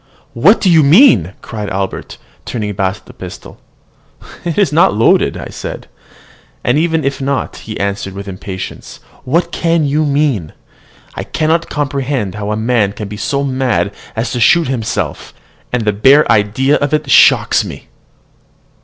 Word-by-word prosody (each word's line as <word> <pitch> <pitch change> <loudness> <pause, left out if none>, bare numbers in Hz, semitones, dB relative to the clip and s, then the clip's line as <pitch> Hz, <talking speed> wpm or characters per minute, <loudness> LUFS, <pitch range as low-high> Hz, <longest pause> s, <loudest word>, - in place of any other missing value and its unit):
"What 175 - +4
do - - 0
you 165 -3 +6
mean?" 140 - +5
cried 105 -3 -5
Albert, 95 0 -4 0.3
turning 105 -3 -4
back 95 +1 -2
the - - -14
pistol. - - -10 0.8
"It 170 +1 -3
is 200 -7 +2
not 160 -9 +4
loaded," 115 - +3 0.2
said - - -7 0.8
I. - - -6
"And 140 - +3
even 160 -2 0
if 135 0 -2
not," 135 0 -2
he 110 - -8
answered 100 -1 -3
with 100 +1 -7
impatience, 95 0 -7 0.3
"what 165 +7 0
can 165 -2 +1
you 150 +2 +1
mean? 140 - 0 0.6
I - - -5
cannot 160 +2 -1
comprehend 135 -7 -2
how 105 0 -5
a 105 - -1
man 110 -3 +1
can 105 0 -6
be 105 - -6
so 140 +4 -1
mad 130 -6 0 0.2
as 115 +2 -2
to 125 - -2
shoot 165 +7 +4
himself, 120 -4 -3 0.4
and 125 -3 -1
the 105 - +2
bare 135 +9 +5
idea 115 +7 +2
of 145 +1 0
it 150 -1 -3
shocks - - +5
me." - - -9
130 Hz, 160 wpm, -15 LUFS, 105-150 Hz, 0.8 s, you